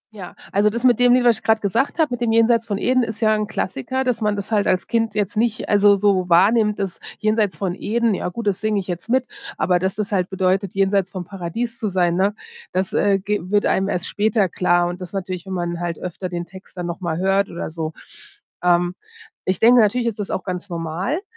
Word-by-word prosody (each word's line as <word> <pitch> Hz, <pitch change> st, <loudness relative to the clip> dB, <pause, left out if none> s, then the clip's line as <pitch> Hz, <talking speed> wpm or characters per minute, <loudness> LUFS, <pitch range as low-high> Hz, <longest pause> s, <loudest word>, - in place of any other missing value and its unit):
Ja, 185 Hz, -4 st, -9 dB, 0.2 s
also, 205 Hz, +2 st, +3 dB
das 235 Hz, +3 st, -4 dB
mit 245 Hz, -3 st, +4 dB
dem 245 Hz, 0 st, +5 dB
Lied, 250 Hz, -, +2 dB
was 235 Hz, -2 st, +4 dB
ich -, -, -32 dB
gerade 220 Hz, 0 st, +3 dB
gesagt 225 Hz, -, 0 dB
habe, 315 Hz, -5 st, +2 dB
mit 245 Hz, -, -4 dB
dem 235 Hz, -2 st, +1 dB
”Jenseits 230 Hz, 0 st, +3 dB
von 205 Hz, -2 st, -1 dB
Eden“ 255 Hz, +4 st, +2 dB
ist 225 Hz, -2 st, -4 dB
ja 215 Hz, -1 st, +3 dB
'n 215 Hz, -1 st, -1 dB
Klassiker, 220 Hz, -, -2 dB
dass 250 Hz, -3 st, -1 dB
man 210 Hz, -1 st, +1 dB
das 200 Hz, +2 st, -6 dB
halt 210 Hz, -2 st, +2 dB
als 185 Hz, -, +1 dB
Kind 225 Hz, -3 st, -1 dB
jetzt 205 Hz, -1 st, -1 dB
nicht 225 Hz, 0 st, 0 dB
also, 205 Hz, 0 st, +5 dB
so 195 Hz, -2 st, +1 dB
wahrnimmt, 210 Hz, +5 st, +4 dB
dass 195 Hz, -3 st, -4 dB, 0.2 s
”Jenseits 215 Hz, -5 st, 0 dB
von 185 Hz, 0 st, -2 dB
Eden,” 230 Hz, +4 st, 0 dB
ja 180 Hz, -, -2 dB
gut, 230 Hz, +5 st, -6 dB
das 200 Hz, -2 st, 0 dB
singe 215 Hz, -1 st, +1 dB
ich 190 Hz, -, -5 dB
jetzt 180 Hz, +3 st, -6 dB
mit, 255 Hz, +1 st, +2 dB, 0.3 s
aber 180 Hz, -1 st, +2 dB
dass 190 Hz, +1 st, -1 dB
das 210 Hz, 0 st, -3 dB
halt 185 Hz, -3 st, 0 dB
bedeutet, 190 Hz, 0 st, 0 dB
jenseits 195 Hz, -1 st, +2 dB
vom 185 Hz, -3 st, -6 dB
Paradies 205 Hz, +7 st, -5 dB
zu 220 Hz, -, -1 dB
sein, 180 Hz, -3 st, +1 dB
ne, 195 Hz, +3 st, +1 dB, 0.4 s
das, 185 Hz, +1 st, -1 dB
äh, 200 Hz, -1 st, +3 dB
ge 205 Hz, +2 st, -2 dB
wird 205 Hz, 0 st, +2 dB
einem 195 Hz, +1 st, +1 dB
erst 180 Hz, -3 st, -2 dB
später 205 Hz, -2 st, +1 dB
klar 175 Hz, 0 st, +2 dB
und 175 Hz, +1 st, -6 dB
das 180 Hz, 0 st, -8 dB
natürlich, 185 Hz, -2 st, -4 dB
wenn 190 Hz, -, -5 dB
man 175 Hz, -1 st, -3 dB
halt 170 Hz, -2 st, -3 dB
öfter 180 Hz, +1 st, -5 dB
den 175 Hz, -1 st, -4 dB
Text 190 Hz, +1 st, -14 dB
dann 175 Hz, -, -3 dB
nochmal 170 Hz, -1 st, -3 dB
hört 195 Hz, +2 st, +1 dB
oder 170 Hz, -, -5 dB
so. 160 Hz, -1 st, -4 dB, 0.7 s
Ähm, 175 Hz, 0 st, +3 dB, 0.5 s
ich 185 Hz, -1 st, 0 dB
denke, 240 Hz, +1 st, +6 dB
natürlich 235 Hz, +3 st, +2 dB
ist 220 Hz, -2 st, -3 dB
das 205 Hz, -, -4 dB
auch 185 Hz, -, -2 dB
ganz 185 Hz, +1 st, -5 dB
normal. 170 Hz, -, -3 dB
200 Hz, 235 wpm, -21 LUFS, 180-220 Hz, 0.7 s, denke